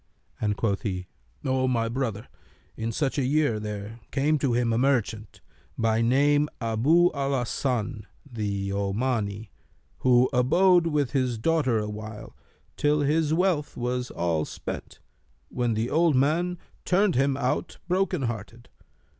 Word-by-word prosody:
and 105 -2 0
quoth 100 -4 0
he, 90 -3 -3 0.4
'O 130 0 +1
my 115 -3 +1
brother, 115 -3 -3 0.5
in 115 +1 -3
such 135 +4 -1
a - - +1
year 140 -4 +1
there 105 +1 -6
came 150 +2 +1
to 130 -3 +1
him 120 -1 +1
a - - +1
merchant, 120 -5 0 0.4
by 115 0 +2
name 145 +5 +3
Abu 135 +11 +3
al 140 -1 -1
Hasan 120 -2 -2 0.2
the 100 -5 -3
Omani, 100 +1 -2 0.5
who 125 0 +4
abode 170 +8 +4
with 150 -5 0
his 130 -4 0
daughter 130 -1 +1
awhile, 105 0 -6 0.4
till 150 0 +2
his 150 +2 +1
wealth 165 -3 +1
was 125 +1 -2
all 85 -2 -1
spent, - - -7 0.5
when 120 -2 -1
the 115 +3 -1
old 165 -1 +3
man 165 +7 +1 0.3
turned 190 +1 +2
him 135 +1 +2
out, 130 -2 -2
broken 180 -4 0
hearted. 115 0 -5
125 Hz, 140 wpm, -26 LUFS, 110-145 Hz, 0.5 s, who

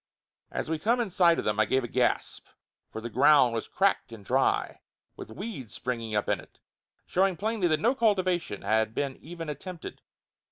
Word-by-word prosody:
As - - -4
we 160 0 -2
come 230 +8 +2
in 225 -5 -1
sight 175 -3 +4
of - - -3
them 105 0 0
I 110 - +5
give 130 +4 +1
a - - -3
gasp, 125 +1 -1 0.4
for 110 - -6
the 115 - -4
ground 135 -1 +5
was 115 - -3
cracked 195 -9 +1
and 110 -3 -11
dry, - - +1 0.3
with - - -9
weeds 140 - -7
springing 115 -3 -3
up 105 - 0
in - - +1
it, - - -16 0.5
showing 190 -1 +1
plainly 215 -1 0
that 155 -2 +2
no 235 +9 +3
cultivation 185 - 0
had 110 0 +1
been 140 -2 -1
even 165 0 -7
attempted. 165 +4 -7
155 Hz, 190 wpm, -28 LUFS, 115-190 Hz, 0.5 s, I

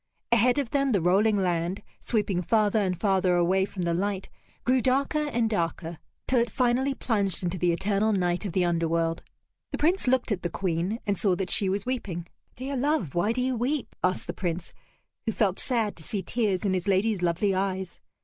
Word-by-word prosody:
Ahead 235 +3 +4
of 275 -5 -1
them 275 -1 +1
the 210 -6 +2
rolling 200 +5 +3
land, 180 +1 -1 0.2
sweeping 200 -5 0
farther 215 +2 +2
and 185 -4 -1
farther 190 -3 +2
away 185 +2 +2
from 195 -2 -5
the 170 -1 0
light, 195 +2 -2 0.3
grew 255 0 +3
darker 280 +4 +1
and 235 -2 +1
darker, 170 -4 -2 0.3
till 255 - +4
it 235 0 +1
finally 255 +4 +1
plunged 200 -8 0
into 180 +1 -2
the 175 0 +2
eternal 200 +5 +1
night 180 -2 0
of 195 -5 -4
the 180 -1 +2
underworld. 165 -1 0 0.5
The - - -4
Prince 335 +1 +1
looked 255 -2 +2
at 195 - -1
the 175 - -2
Queen, 185 +5 -2
and 200 -3 0
saw 190 -4 +3
that 185 -1 -3
she 195 - +4
was 200 +1 -1
weeping. 205 -10 -3 0.3
"Dear 270 +3 -4
love, 265 - 0
why 175 +5 +1
do 250 +2 -1
you 260 0 0
weep?" 255 +4 -2
asked 185 0 +1
the - - -4
Prince, 175 -1 -4 0.5
who - - +2
felt 200 -3 0
sad 230 -6 0
to - - -9
see 195 +4 -4
tears 210 -2 0
in 195 - +2
his 185 +1 -2
lady's 200 0 +2
lovely 180 +3 +1
eyes. 190 -1 -2
200 Hz, 200 wpm, -27 LUFS, 180-235 Hz, 0.5 s, Ahead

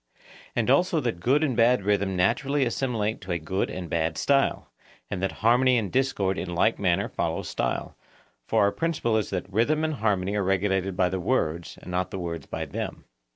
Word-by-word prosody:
And 120 +1 +2
also 170 +3 +3
that 120 -9 -2
good 135 - +2
and 135 -6 0
bad 115 -2 +4
rhythm 100 -1 +1
naturally 135 +10 +1
assimilate 115 -3 -1
to 95 -2 -6
a - - 0
good 90 +4 -2
and 90 -1 -5
bad 80 0 -1
style; 140 -1 +1 0.4
and 95 -3 -3
that 95 - 0
harmony 125 +2 +5
and 105 -6 -2
discord 105 -8 0
in 85 - -4
like 110 +6 +2
manner 90 -3 +1
follow - - -2
style; - - -3 0.5
for - - +3
our 100 - +3
principle 160 -8 -1
is 110 -2 0
that 95 -3 -3
rhythm 120 +11 +1
and 155 0 0
harmony 100 -6 0
are 105 - +1
regulated 95 0 0
by 90 -3 +3
the 95 +1 -2
words, 85 -6 -1
and - - -8
not 90 +1 -1
the 95 - -5
words 85 -4 -5
by - - -4
them. - - -5
100 Hz, 200 wpm, -26 LUFS, 90-125 Hz, 0.5 s, harmony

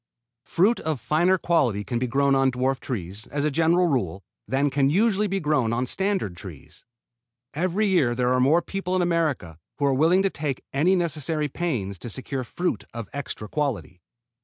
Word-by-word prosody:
Fruit 205 +7 +2
of 155 -4 -2
finer 160 +10 +2
quality 130 - +1
can 115 +4 -2
be 125 - -1
grown 140 +2 +2
on 135 0 +3
dwarf 130 +1 0
trees, 100 -4 -6
as 145 0 -2
a 150 - +1
general 165 +4 +3
rule, 100 - -1 0.2
than 135 +5 +1
can 135 -1 +2
usually 210 +4 +2
be 195 0 -1
grown 150 -8 +1
on 125 +2 0
standard 190 - -1
trees. 85 -5 -12 0.7
Every 185 +6 0
year 160 -12 +2
there 125 0 +1
are 130 - +2
more 150 +7 +4
people 195 -1 -3
in 185 - +2
America 155 - -1 0.2
who 145 - 0
are 140 - +3
willing 165 +8 +3
to 195 - +1
take 145 -3 -4
any 165 +8 +3
necessary 155 -3 -1
pains 120 - -3
to 120 - -7
secure 130 +3 -3
fruit 175 - -2
of 115 -4 -6
extra 130 -6 -5
quality. 120 - -3
140 Hz, 185 wpm, -25 LUFS, 125-175 Hz, 0.7 s, more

